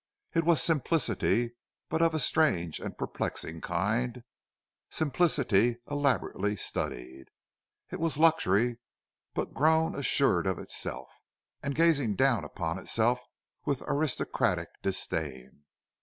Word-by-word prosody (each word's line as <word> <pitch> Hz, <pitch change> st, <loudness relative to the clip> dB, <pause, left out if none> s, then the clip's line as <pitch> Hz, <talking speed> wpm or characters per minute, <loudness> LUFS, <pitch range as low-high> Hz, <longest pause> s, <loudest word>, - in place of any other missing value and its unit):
It 165 Hz, -2 st, +2 dB
was 165 Hz, -5 st, +4 dB
simplicity, 140 Hz, -6 st, +1 dB, 0.3 s
but 160 Hz, +1 st, -1 dB
of 165 Hz, -1 st, +3 dB
a -, -, +1 dB
strange 90 Hz, -, +2 dB
and -, -, -6 dB
perplexing 80 Hz, 0 st, -4 dB
kind—simplicity 120 Hz, -, -1 dB
elaborately 140 Hz, -7 st, 0 dB
studied. 65 Hz, -7 st, -4 dB, 0.7 s
It -, -, -5 dB
was 165 Hz, -3 st, 0 dB
luxury, 120 Hz, -, +3 dB, 0.6 s
but -, -, -2 dB
grown 160 Hz, +2 st, +3 dB
assured 135 Hz, -9 st, +2 dB
of 95 Hz, -3 st, 0 dB
itself, -, -, -4 dB, 0.5 s
and 140 Hz, 0 st, -3 dB
gazing 145 Hz, -10 st, +3 dB
down 130 Hz, -1 st, +3 dB
upon 85 Hz, 0 st, -4 dB
itself 115 Hz, +6 st, +1 dB, 0.4 s
with 140 Hz, -2 st, -1 dB
aristocratic 145 Hz, -1 st, 0 dB
disdain. 75 Hz, -7 st, -3 dB
125 Hz, 105 wpm, -29 LUFS, 95-155 Hz, 0.7 s, was